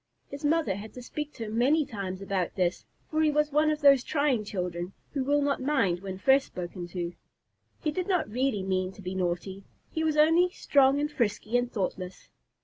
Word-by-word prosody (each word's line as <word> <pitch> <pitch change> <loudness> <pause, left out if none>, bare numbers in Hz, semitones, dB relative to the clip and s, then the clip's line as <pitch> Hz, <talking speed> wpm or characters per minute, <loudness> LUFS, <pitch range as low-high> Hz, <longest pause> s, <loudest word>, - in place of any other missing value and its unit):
His 280 +1 -8
mother 300 -8 +2
had 215 +2 -9
to 250 - -8
speak 300 +4 -5
to 230 - -6
him 220 +2 -2
many 295 +5 +3
times 195 -5 -5
about 190 -3 -2
this, 180 -2 0 0.3
for 310 0 +1
he 310 - +4
was 300 0 +1
one 305 +2 +3
of 305 0 -1
those 275 -3 +6
trying 285 -7 +1
children 180 -2 -4 0.2
who 275 -2 -1
will 290 +2 +2
not 280 -2 0
mind 260 -11 +1
when 190 0 -6
first 265 +6 +4
spoken 175 0 -6
to. 175 0 -4 0.7
He 305 - +1
did 360 +4 -3
not 360 -5 +1
really 245 -3 0
mean 185 -1 -1
to 200 - -13
be 180 +1 -4
naughty 185 +1 -2 0.3
he 320 - -1
was 310 -1 +1
only 325 +4 +5
strong 280 -6 +3
and 295 +1 -1
frisky 230 -3 -1
and 245 0 +1
thoughtless. 185 -2 -4
245 Hz, 205 wpm, -28 LUFS, 190-295 Hz, 0.7 s, those